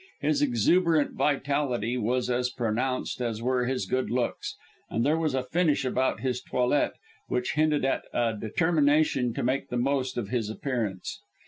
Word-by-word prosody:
His 150 +1 +1
exuberant 150 - +3
vitality 135 -5 0
was 125 +1 0
as 125 0 0
pronounced 125 +1 -2
as 115 -3 -2
were 125 0 +1
his 130 -6 -1
good 130 +5 -1
looks, 120 +1 -2 0.3
and 115 +2 0
there 155 +3 +2
was 155 -4 0
a 130 - 0
finish 150 0 +1
about 130 +1 0
his 125 -1 -1
toilette 125 +3 +1 0.3
which 125 0 -1
hinted 150 -2 +2
at 135 - 0
a 115 -2 0
determination 145 +2 +2
to - - -2
make 130 +3 0
the 125 - -2
most 130 0 0
of 110 -5 -3
his 115 -4 -1
appearance. 110 -6 -3
130 Hz, 160 wpm, -27 LUFS, 120-145 Hz, 0.3 s, exuberant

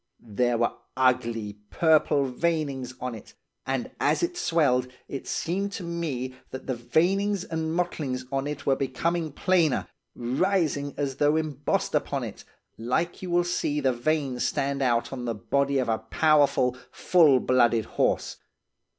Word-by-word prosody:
There 120 +2 +2
were 120 0 +1 0.2
ugly, 115 -5 +1
purple 155 -3 +3
veinings 135 -2 -2
on 125 -1 -4
it, 110 - -12 0.3
and 130 -2 -2
as - - +2
it 350 +1 -1
swelled, 140 - +2 0.2
it 135 - -6
seemed 195 +4 -2
to 190 - -5
me 155 -7 -3 0.2
that 130 - -8
the 130 - -1
veinings 185 - +1
and 160 -1 -3
mottlings 145 -8 -2
on 135 +1 -1
it 145 -1 -5
were 135 - +3
becoming 165 +4 -1
plainer, 165 -2 +2 0.3
rising 145 +2 0
as 140 -2 -2
though 145 +1 +3
embossed 150 -3 -1
upon - - 0
it, - - -7 0.4
like 125 +9 -1
you 185 - -5
will 175 0 +3
see 160 -4 -1
the 135 -3 +2
veins 135 0 -1
stand 140 -1 -1
out 120 -1 +1
on 125 -2 -5
the 115 -1 -2
body 140 +5 0
of 130 - 0
a 110 -1 +1
powerful, 135 +1 +3 0.2
full 155 -7 +4
blooded 120 -4 +3
horse. - - 0
140 Hz, 150 wpm, -26 LUFS, 125-165 Hz, 0.4 s, full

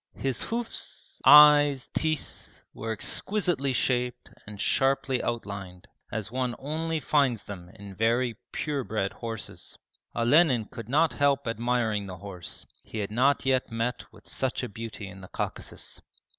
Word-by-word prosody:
His 135 -3 -1
hoofs, 230 0 -4
eyes, 145 -2 +8
teeth, 155 -3 -3
were 115 +1 -4
exquisitely 145 - 0
shaped 125 0 0 0.2
and 105 -1 -9
sharply 135 +2 +2
outlined, 100 -6 -5 0.2
as 110 0 -3
one 125 -1 -1
only 160 +3 -2
finds 135 -6 +2
them 90 -4 -9
in 100 -1 -10
very 115 +3 +1 0.2
pure 145 -3 -2
bred 105 -4 -2
horses. 115 -2 -6 0.4
Olenin 125 -1 +4
could 115 0 -9
not 155 +5 +3
help 140 -2 +2
admiring 115 -3 0
the 90 -1 -7
horse, 90 -2 -7 0.2
he - - -8
had 105 -1 -2
not 135 +6 +2
yet 130 -2 +1
met 115 +2 -3
with - - -18
such - - -2
a - - -3
beauty 110 -1 -7
in 95 0 -11
the 95 - -10
Caucasus. - - -5
120 Hz, 145 wpm, -28 LUFS, 105-140 Hz, 0.4 s, eyes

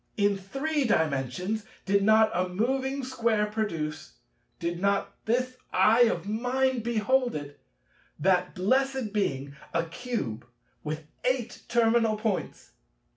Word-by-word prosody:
In 205 -1 +3
Three 275 +10 -2
Dimensions, 160 - 0 0.2
did 200 +1 +3
not 220 +1 +5
a 180 +1 0
moving 265 +7 -1
Square 230 -4 0
produce—did 165 - -5
not 200 0 +1
this 255 +3 0
eye 220 +6 +5
of 195 -5 -1
mine 250 +4 +1
behold 240 +2 +1
it—that 150 - -3
blessed 260 +3 +1
Being, 140 -9 -1 0.2
a 170 0 +2
Cube, 165 - -4 0.4
with 155 +1 -4 0.2
eight 250 -2 -1
terminal 230 -2 +3
points? 215 -4 -3
215 Hz, 110 wpm, -28 LUFS, 175-245 Hz, 0.4 s, not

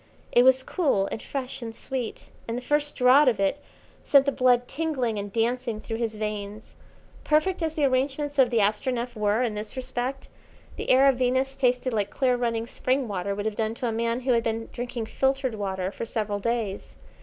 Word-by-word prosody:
It 240 - +6
was 260 0 +5
cool, 275 - +1
and - - -4
fresh, 265 -2 -4
and 225 -1 -6
sweet, 255 -3 -5 0.2
and 230 +1 -2
the - - -4
first 295 +2 0
draught 260 +3 +6
of 225 -5 -1
it 195 +9 +1 0.4
sent 280 -1 +5
the 280 - +2
blood 250 -2 +3
tingling 270 -8 -1
and 200 0 -5
dancing 230 0 -1
through 225 +1 -5
his 225 -2 -2
veins. 210 0 -5 0.5
Perfect 310 +5 +1
as 320 -1 -1
the 295 - +2
arrangements 275 +2 0
of 255 -2 +6
the 235 - 0
Astronef 235 +4 0
were 215 +2 +1
in 235 -3 -1
this 210 +4 -6
respect, 260 +1 -3 0.5
the - - -5
air 265 +2 +6
of 270 -2 +4
Venus 260 +2 +1
tasted 250 -1 +1
like 205 -2 0
clear 255 -2 +1
running 230 -2 -1
spring 255 +2 -1
water 200 -1 -2
would 205 +1 -4
have 220 -1 -1
done 220 +1 -1
to 245 - -4
a - - 0
man 230 +2 -1
who 255 0 0
had 235 -1 +3
been 225 0 -3
drinking 240 -1 -4
filtered 265 +2 0
water 190 -3 -3
for 230 - -6
several 210 -2 -2
days. 220 -2 -3
245 Hz, 200 wpm, -26 LUFS, 220-265 Hz, 0.5 s, It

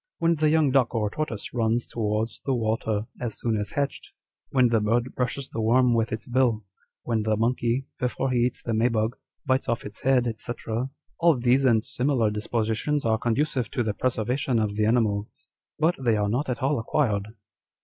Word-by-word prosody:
When 165 0 +3
the 155 -1 +2
young 155 -3 +3
duck 130 -3 +2
or 105 -2 0
tortoise 140 -8 -4
runs 115 0 +1
towards 110 0 -2
the 135 - 0
water 110 -2 -1
as 120 -3 -4
soon 115 -2 0
as 105 -1 -3
hatched, 140 -1 -3 0.4
when 130 -3 +4
the 115 -1 +3
bird 115 +4 0
brushes 130 +2 -2
the 115 - -3
worm 120 +2 +4
with 115 0 +1
its 110 - -4
bill, 120 -4 +1 0.4
when 115 -2 0
the 110 0 0
monkey, 120 +2 0
before 125 +2 -1
he 125 - +2
eats 125 +1 0
the 115 - -2
may 110 +2 +3
bug, 115 0 0 0.3
bites 130 -1 +1
off 115 - -1
its 105 +1 -9
head; 130 -2 +3
&c. - - -5 0.2
â€" 115 +4 -1 0.3
all 170 -4 +4
these 125 +3 +3
and 115 -3 +3
similar 130 -4 +1
dispositions 110 +6 -1
arc 110 -1 +1
conducive 125 +1 0
to 125 -4 -1
the 110 -2 -1
preservation 125 +2 0
of 105 -2 0
the 105 0 +2
animals; 110 -3 0 0.3
but 160 +3 +3
they 115 -3 +3
are 105 -1 0
not 130 +6 -1
at 125 0 -3
all 140 0 +2
acquired." 110 -4 -1
120 Hz, 195 wpm, -26 LUFS, 110-130 Hz, 0.4 s, when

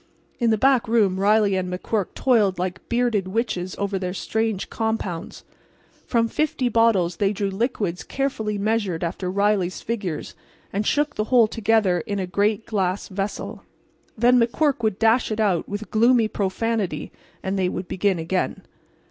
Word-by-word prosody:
In 235 -2 +2
the 220 - +3
back 260 +1 +3
room 210 -5 +2
Riley 205 0 +3
and 185 -1 -2
McQuirk 190 +2 -2
toiled 215 -7 +3
like 180 0 -3
bearded 235 -5 +1
witches 185 -3 -2
over 200 -1 -1
their 180 0 -3
strange 220 -1 -1
compounds. 215 -6 -3 0.6
From 230 -2 +2
fifty 260 0 0
bottles 215 -7 +2
they 200 -1 +2
drew 200 -1 -2
liquids 200 -4 -2
carefully 220 -7 -2
measured 205 -5 -1
after 180 +2 -3
Riley's 200 -1 +1
figures, 205 -8 -4 0.4
and 205 +2 -1
shook 295 0 +1
the 215 - 0
whole 240 0 +5
together 215 -4 +2
in 205 - -2
a 190 - -1
great 205 +4 0
glass 195 -3 -1
vessel. 195 +1 -4 0.6
Then 245 +2 +5
McQuirk 280 +4 +1
would 215 -4 0
dash 225 +2 +3
it 215 - -2
out, 195 -6 +1
with 205 +2 -5
gloomy 230 +1 +4
profanity, 210 0 -2 0.3
and 190 +1 -1
they 185 -1 +1
would 180 0 -5
begin 190 -1 0
again. 170 +3 -2
210 Hz, 155 wpm, -23 LUFS, 190-230 Hz, 0.6 s, whole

